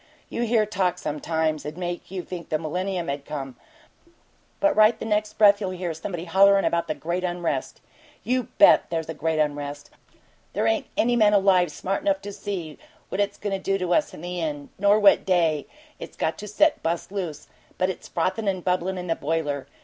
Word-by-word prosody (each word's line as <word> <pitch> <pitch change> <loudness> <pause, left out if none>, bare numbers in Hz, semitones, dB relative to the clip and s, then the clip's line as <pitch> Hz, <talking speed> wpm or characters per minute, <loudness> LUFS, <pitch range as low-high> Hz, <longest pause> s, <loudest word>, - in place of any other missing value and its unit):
You - - -3
hear 220 -1 +3
talk, 190 -4 0
sometimes, 155 +1 -1
'd 150 +2 -7
make 175 -1 -4
you 185 -1 -5
think 175 -3 -8
the 155 - +1
millennium 180 +3 -3
had 140 0 -3
come 135 -3 -6 1.0
but 300 - +3
right 215 +2 +5
the - - -6
next 210 -1 0
breath 205 -1 +5
you'll 190 - -1
hear 180 -2 -3
somebody 170 +2 -5
hollerin' 195 +3 +5
about 170 0 0
'the 155 - -2
great 175 +3 -3
unrest.' 175 -6 -2 0.4
You 250 0 0
BET - - +6
there's 165 -1 -3
a - - -2
'great 160 +1 -1
unrest'! 145 -1 -2 0.6
There - - 0
ain't - - +1
any 240 +1 +3
man 210 -3 +4
alive 185 -4 +4
smart 190 - -3
enough 295 -1 +1
to 205 0 -6
see 175 -7 -5 0.3
what 200 - -1
it's 200 0 -1
goin' 205 -1 -3
to 195 - -1
do 195 +1 0
to 180 -2 -1
us 305 - +2
in - - -11
the 175 0 -4
end, 145 -3 -4
nor 205 +2 +4
what 205 -2 +5
day 165 -5 +1 0.3
it's - - -9
got 160 - -1
set 210 +10 +3
to - - -31
bust 170 +3 -2
loose, 175 -7 -5 0.3
but 185 +1 +1
it's - - -10
frothin' 190 +5 -1
and 185 -2 -1
bubblin' 185 +1 0
in 180 - -5
the 165 -2 0
boiler. 145 -2 -2
180 Hz, 205 wpm, -25 LUFS, 160-200 Hz, 1.0 s, BET